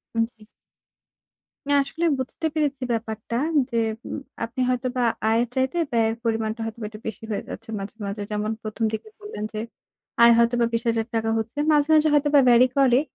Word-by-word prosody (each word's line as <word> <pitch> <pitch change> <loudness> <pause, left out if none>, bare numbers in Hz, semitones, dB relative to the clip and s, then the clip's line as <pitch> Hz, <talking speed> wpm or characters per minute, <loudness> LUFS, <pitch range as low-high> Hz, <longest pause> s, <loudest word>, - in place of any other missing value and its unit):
হুম, 230 - +3
জি। - - -28 1.3
না 285 - +2
আসলে 330 +5 -3
বুঝতে 260 +5 -4
পেরেছি 290 -3 -1
ব্যাপারটা, 220 0 -4 0.3
যে 235 - -2 0.3
উম - - -4 0.2
আপনি 235 +3 -3
হয়তোবা 250 0 0 0.3
আয়ের 230 +2 +2
চাইতে 260 +5 0
ব্যয়ের 225 -1 +2
পরিমাণটা 225 0 -1
হয়তোবা 225 0 -6
একটু 215 0 -11
বেশি 220 0 -6
হয়ে 205 - -2
যাচ্ছে - - -8
মাঝে, 195 +2 -7
মাঝে। 200 +1 -4
যেমন 210 +1 -1
প্রথম 215 +1 -4
দিকে 220 - -4
বললেন 415 - -7
যে, 215 - -3 0.6
আয় 235 0 +9
হয়তোবা 235 0 +3
২০,০০০ 230 -1 0
টাকা 225 0 0
হচ্ছে। 225 +4 -4
মাঝে, 295 -1 +3
মাঝে 310 0 +5
হয়তোবা 290 0 +4
ভ্যারি 240 +1 +6
করে। 260 -2 +5
235 Hz, 170 wpm, -24 LUFS, 220-260 Hz, 1.3 s, আয়